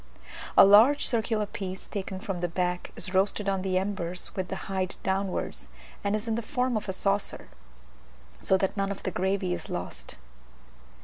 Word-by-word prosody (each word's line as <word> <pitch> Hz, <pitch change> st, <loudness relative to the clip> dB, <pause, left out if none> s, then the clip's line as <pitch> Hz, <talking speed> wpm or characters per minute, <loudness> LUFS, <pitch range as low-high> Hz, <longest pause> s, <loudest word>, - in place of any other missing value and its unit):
A -, -, +11 dB
large 225 Hz, +9 st, +7 dB
circular 225 Hz, -3 st, +1 dB
piece 190 Hz, -2 st, -6 dB
taken 190 Hz, -2 st, -4 dB
from 195 Hz, -4 st, -4 dB
the 175 Hz, -, +1 dB
back 180 Hz, +1 st, -2 dB
is 185 Hz, -, -4 dB
roasted 195 Hz, +2 st, +1 dB
on 195 Hz, -1 st, +1 dB
the 185 Hz, -1 st, 0 dB
embers 185 Hz, -2 st, -2 dB
with 185 Hz, -1 st, -2 dB
the 190 Hz, -, -4 dB
hide 190 Hz, -1 st, -2 dB
downwards 190 Hz, -, -2 dB, 0.3 s
and 200 Hz, +1 st, +1 dB
is 215 Hz, +1 st, -2 dB
the 230 Hz, 0 st, -1 dB
form 250 Hz, +2 st, -1 dB
of 210 Hz, -2 st, -2 dB
a -, -, +2 dB
saucer, 195 Hz, +1 st, 0 dB, 0.9 s
so 190 Hz, -, +3 dB
that 190 Hz, +1 st, -1 dB
none 195 Hz, -1 st, 0 dB
of 200 Hz, -, -5 dB
the 185 Hz, -, -1 dB
gravy 190 Hz, -1 st, 0 dB
is -, -, -5 dB
lost. -, -, -5 dB
195 Hz, 175 wpm, -28 LUFS, 185-205 Hz, 0.9 s, A